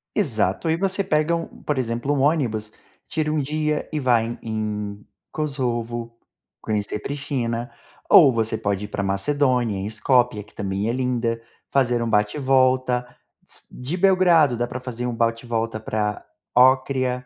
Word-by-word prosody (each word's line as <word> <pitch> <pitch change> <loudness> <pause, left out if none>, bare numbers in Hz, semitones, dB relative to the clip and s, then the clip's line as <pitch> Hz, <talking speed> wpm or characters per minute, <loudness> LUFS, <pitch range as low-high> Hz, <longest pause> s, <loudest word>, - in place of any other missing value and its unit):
Exato. 115 - 0
Aí 160 - +3
você 195 +2 0
pega 155 +1 +1
um, 165 - -3 0.2
por 150 - -1
exemplo, 120 +2 -1
um 145 - 0
ônibus, 120 -8 +1 0.4
tira 155 -1 -1
um 155 - +1
dia 150 +2 -1
e 150 - 0
vai 120 -4 +3
em 120 +1 -6
em 105 -2 -4 0.3
Kosovo, 120 -5 -3 0.4
conhecer 105 -1 -2
Pristina. 125 -4 -3 0.4
Ou 135 - +8
você 115 -1 0
pode 100 -1 -2
ir - - -7
para 105 - -3
Macedônia, 125 +2 +1
em 95 - -4
Escópia, 110 +1 +2
que 105 - -21
também 100 +2 -2
é - - +2
linda, 120 -2 -1 0.3
fazer 125 -3 +2
um 115 - -2
bate 105 +1 +2
e - - -3
volta. 130 -2 +2 0.4
S - - -7
de 130 +7 -4
Belgrado 175 -8 +4
dá 120 +1 -1
para 125 +1 -6
fazer 125 -1 -4
um 120 - -3
bate 115 0 0
e - - -12
volta 115 -1 -2
para 105 -1 -2 0.3
Ócrida, 130 0 +3
125 Hz, 165 wpm, -23 LUFS, 110-140 Hz, 0.4 s, Ou